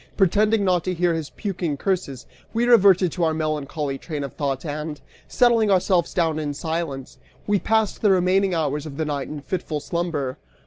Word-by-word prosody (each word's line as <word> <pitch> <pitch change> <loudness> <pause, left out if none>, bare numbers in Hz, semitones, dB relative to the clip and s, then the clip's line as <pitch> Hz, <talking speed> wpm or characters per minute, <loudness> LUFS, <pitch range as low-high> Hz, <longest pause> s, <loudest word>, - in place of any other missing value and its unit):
Pretending 210 +2 +3
not 180 -3 +2
to 185 -1 -1
hear 175 0 +2
his 160 -3 -3
puking 175 -8 -3
curses, 155 -8 -2 0.3
we 235 +1 +2
reverted 195 -7 +5
to 175 - -2
our 160 -1 +2
melancholy 150 -2 -2
train 150 -4 -5
of 140 - -6
thought 140 0 -3
and, 150 0 -4 0.3
settling 235 -3 +3
ourselves 185 -3 +2
down 160 -3 0
in 145 -2 -3
silence, 160 -4 -4 0.3
we 205 -1 +2
passed 220 0 0
the 210 - +4
remaining 190 0 +3
hours 150 -1 -1
of 140 -2 -9
the 160 - -1
night 145 -2 -3
in 150 -1 -7
fitful 155 -1 -3
slumber. 150 -5 -3
165 Hz, 180 wpm, -23 LUFS, 150-190 Hz, 0.3 s, reverted